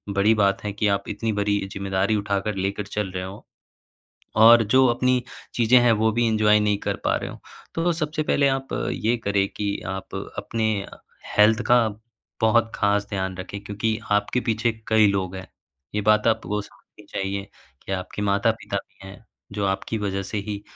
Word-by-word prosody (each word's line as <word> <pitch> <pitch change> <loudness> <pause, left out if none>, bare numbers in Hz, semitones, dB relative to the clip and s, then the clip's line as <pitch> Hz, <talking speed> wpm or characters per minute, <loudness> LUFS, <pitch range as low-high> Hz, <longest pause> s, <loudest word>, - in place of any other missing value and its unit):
बड़ी 105 +3 +4
बात 100 -2 +1
है 105 - -2
कि 105 - +2
आप 100 - -5
इतनी 110 +2 -2
बड़ी 105 0 0 0.2
जिम्मेदारी 95 +2 0
उठाकर 100 0 -1
लेकर 100 +2 -2
चल 105 -2 -3
रहे 90 0 -4
हो। 95 +3 -9 1.0
और 115 +1 +9
जो 130 0 +7
अपनी 125 +1 +1 0.3
चीज़ें 120 +1 +5
हैं। 120 -1 +4
वो 110 - +4
भी 120 - +3
एन्जॉय 105 -1 +4
नहीं 105 -1 +2
कर - - -1
पा - - +2
रहे - - -4
हो। - - -11 0.3
तो 170 +1 +1
सबसे 155 -1 -2
पहले 140 -2 +2
आप 135 0 -1 0.2
ये 115 +3 0
करें 100 -1 +2
कि, 100 -1 -3
आप 95 0 -6 0.2
अपने 115 -1 -1 0.7
हेल्थ 110 +2 +5
का 125 - +7 0.6
बहुत 115 +1 +3
ख़ास 100 0 +1
ध्यान 95 -2 -2
रखें 95 +2 -6
क्योंकि, 110 +2 -1
आपके 105 +4 +1
पीछे 115 +1 +1 0.2
कई 110 -1 +5
लोग 95 -2 -1
हैं। 95 0 -8 0.5
ये 105 - +1
बात 105 +1 +3
आपको 105 0 -4
समझनी 105 - -20
चाहिए 100 +1 -3 0.4
कि - - -4
आपके 95 +2 -4
माता-पिता 100 +1 0
भी 95 - -16
हैं। 105 +3 -13 0.3
जो 100 0 -2
आपकी 95 +3 -2
वज़ह 95 0 -2
से 105 - -2
ही 105 -1 -4
105 Hz, 180 wpm, -24 LUFS, 100-115 Hz, 1.0 s, और